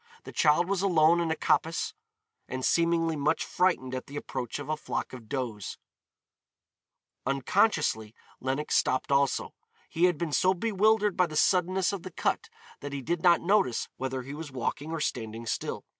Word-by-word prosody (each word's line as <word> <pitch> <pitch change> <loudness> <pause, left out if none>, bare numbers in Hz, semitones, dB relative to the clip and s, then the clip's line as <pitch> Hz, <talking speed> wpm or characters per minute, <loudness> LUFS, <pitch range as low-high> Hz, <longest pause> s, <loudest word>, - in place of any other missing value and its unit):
The - - -9
child 160 +3 +3
was 195 -1 0
alone 170 -3 +4
in 170 -1 0
a 160 - +1
coppice 165 +1 0 0.5
and 130 0 -3
seemingly 165 -1 +2
much 145 0 0
frightened 170 -8 +1
at 130 - -4
the 140 - -10
approach 125 -4 -4
of 145 -1 -7
a 155 - 0
flock 150 - -4
of 120 -4 -10
does. 120 -7 -4 1.5
Unconsciously 135 - +1 0.2
Lenox 135 +4 -1
stopped 130 +2 +1
also. 140 0 +1 0.4
He 170 +2 +2
had 175 -3 +2
been 165 -1 -3
so 185 +3 +3
bewildered 210 0 +2
by 180 -1 +3
the 155 - -8
suddenness 185 +3 +2
of 195 - -4
the 185 - -7
cut - - -1 0.3
that 145 0 -7
he 140 -1 -4
did 170 +6 -1
not 175 -1 +5
notice 175 - +1
whether 130 -1 -3
he 135 +3 -8
was 150 -1 -7
walking 130 +4 -3
or 165 -1 -3
standing 115 -3 -3
still. 110 - -3
155 Hz, 175 wpm, -28 LUFS, 130-175 Hz, 1.5 s, not